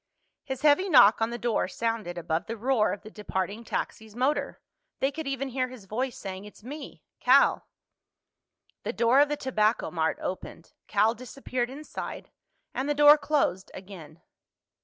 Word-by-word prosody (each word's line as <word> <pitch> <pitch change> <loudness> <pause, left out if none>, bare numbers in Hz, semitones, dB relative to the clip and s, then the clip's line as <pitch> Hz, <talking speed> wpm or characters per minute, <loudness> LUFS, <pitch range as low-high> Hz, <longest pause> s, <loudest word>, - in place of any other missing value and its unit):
His 265 0 -6
heavy 305 +6 +4
knock 225 - +7
on 225 - +2
the 240 - -4
door 235 -5 0
sounded 215 -3 -3
above 165 0 -2
the 230 - -4
roar 235 -1 +2
of 200 - -6
the 215 - -11
departing 205 +1 -4
taxi's 220 -1 -5
motor. 265 +5 0 0.4
They 270 - +1
could 315 0 -6
even 275 0 -2
hear 255 0 -1
his 250 -6 -12
voice 245 +6 -3
saying, 190 -1 -6
"It's 210 0 -14
me—Cal." 285 +4 +1 1.1
The - - -4
door 235 +6 +4
of 290 0 +5
the 295 - -1
Tobacco 220 -5 0
Mart 160 -2 0
opened, 175 -2 -6
Cal 215 +2 +3
disappeared 250 0 -4
inside, 295 +4 -7 0.4
and 270 +2 -2
the 295 - +1
door 295 +1 +8
closed 285 -11 0
again. 170 -5 -11
235 Hz, 160 wpm, -27 LUFS, 200-270 Hz, 1.1 s, door